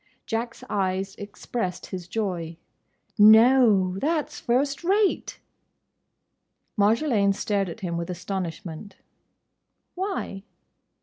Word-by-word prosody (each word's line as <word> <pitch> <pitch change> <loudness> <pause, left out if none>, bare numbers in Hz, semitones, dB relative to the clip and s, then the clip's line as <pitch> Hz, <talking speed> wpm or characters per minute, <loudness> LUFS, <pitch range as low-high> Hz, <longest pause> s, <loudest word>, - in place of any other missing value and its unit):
Jack's 230 +1 -4
eyes 195 -1 -1
expressed 200 -1 -5
his 180 -2 -6
joy. 180 -6 -3 0.6
"No!—that's 220 - +5
first 275 +5 0
rate!" 395 +3 +1 1.4
Marjolaine 210 -1 +2
stared 200 -2 -1
at 170 - -9
him 170 -3 -3
with 170 +1 -4
astonishment. 180 0 -5 1.0
"Why?" 370 - -4
200 Hz, 80 wpm, -25 LUFS, 185-240 Hz, 1.4 s, No!—that's